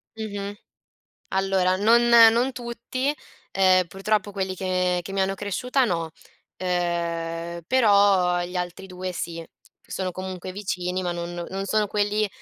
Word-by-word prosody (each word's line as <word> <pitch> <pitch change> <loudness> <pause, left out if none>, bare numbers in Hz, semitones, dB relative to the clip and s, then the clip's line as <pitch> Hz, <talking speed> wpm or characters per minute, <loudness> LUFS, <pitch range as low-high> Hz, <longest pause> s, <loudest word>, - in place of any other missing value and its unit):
Mh-mh. 205 -2 -5 0.8
Allora 190 -1 +2
non 230 +4 +4
non 235 +2 +6
tutti. 245 +3 -3 0.4
Ehm, 185 -2 +4
purtroppo 205 +2 -1
quelli 190 -1 -2
che 185 -1 0
che 195 +2 -8
mi 195 - -1
hanno 190 0 +1
cresciuta 250 +7 0
no, 165 -7 -1 0.5
ehm, 170 -1 -2
però 200 -7 +4
agli 175 +1 -2
altri 180 +2 -4
due 185 0 -5
sì, 170 -1 -4 0.4
che - - -28
sono 185 -1 -2
comunque 185 0 -6
vicini 185 -2 -3
ma 175 -1 -1
non 175 0 -5
non 195 +1 -4
sono 215 +1 +1
quelli 210 +1 0
190 Hz, 140 wpm, -24 LUFS, 180-210 Hz, 0.8 s, non